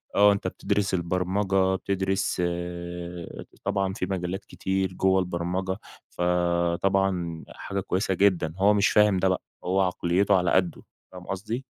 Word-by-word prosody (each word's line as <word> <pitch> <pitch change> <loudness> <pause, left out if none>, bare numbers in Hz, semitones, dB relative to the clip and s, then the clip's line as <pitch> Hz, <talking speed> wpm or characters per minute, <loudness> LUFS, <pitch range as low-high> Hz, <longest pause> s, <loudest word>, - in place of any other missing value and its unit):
آه 105 0 +7
أنتَ 100 -2 -1
بتدرس 100 +1 -1
البرمجة، 95 +2 +1
بتدرس 95 -1 -1 1.2
طبعًا 95 -1 0
في 90 - -2
مجالات 95 +1 -3
كتير 95 -1 -2
جوّه 95 +1 +3
البرمجة، 90 +2 -2 0.3
فطبعًا 90 0 0
حاجة 100 - -5
كويسة 95 +1 -1
جدًا، 90 -4 +2
هو 100 +2 +5
مش 105 0 +3
فاهم 105 -2 +4
ده 95 - +2
بقى، 95 - 0 0.2
هو 95 +2 +1
عقليته 95 +2 +2
على 90 -1 +1
قدّه، 90 -3 +1 0.3
فاهم 90 -1 -10
قصدي؟ 110 +7 -4
95 Hz, 130 wpm, -26 LUFS, 90-95 Hz, 1.2 s, آه